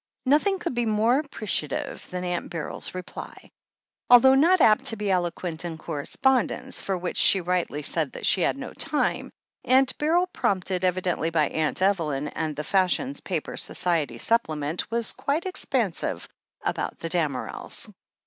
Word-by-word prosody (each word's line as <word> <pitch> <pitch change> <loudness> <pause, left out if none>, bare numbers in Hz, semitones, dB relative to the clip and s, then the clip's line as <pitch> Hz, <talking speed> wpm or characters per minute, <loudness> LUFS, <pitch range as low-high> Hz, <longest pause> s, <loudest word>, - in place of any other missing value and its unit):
Nothing 305 +9 +3
could 345 -5 -3
be 240 -1 0
more 220 +5 +3
appreciative 215 - -3
than 180 0 -4
Aunt 175 -1 -3
Beryl's 165 +2 -5
reply. 185 -1 -9 0.6
Although 245 +2 +8
not 335 +7 +5
apt 215 -7 +5
to 225 - +1
be 205 -2 -1
eloquent 175 -2 -2
in 170 -2 -5
correspondence, 255 - -1
for 190 -1 -2
which 175 0 -4
she 195 - +5
rightly 175 -4 -1
said 155 0 0
that - - -5
she 185 - +3
had 175 - +1
.no 265 -2 -7
time, 305 -2 -1 0.3
Aimt 260 +1 +4
Beryl, 335 +4 +3
prompted 185 - -1
evidently 180 -3 0
by 155 -3 +1
Aunt 160 +3 -1
Evelyn 155 -7 +1
and 155 -2 -3
the 150 - -4
fashion 195 - +1
paper's - - -3
Society 155 -9 0
supplement, 155 - 0
was 230 -1 +1
quite 300 +5 -1
expansive 375 - -1 0.4
about - - -2
the 165 - -5
Damerels. 155 -7 -2
185 Hz, 150 wpm, -25 LUFS, 165-255 Hz, 0.6 s, Although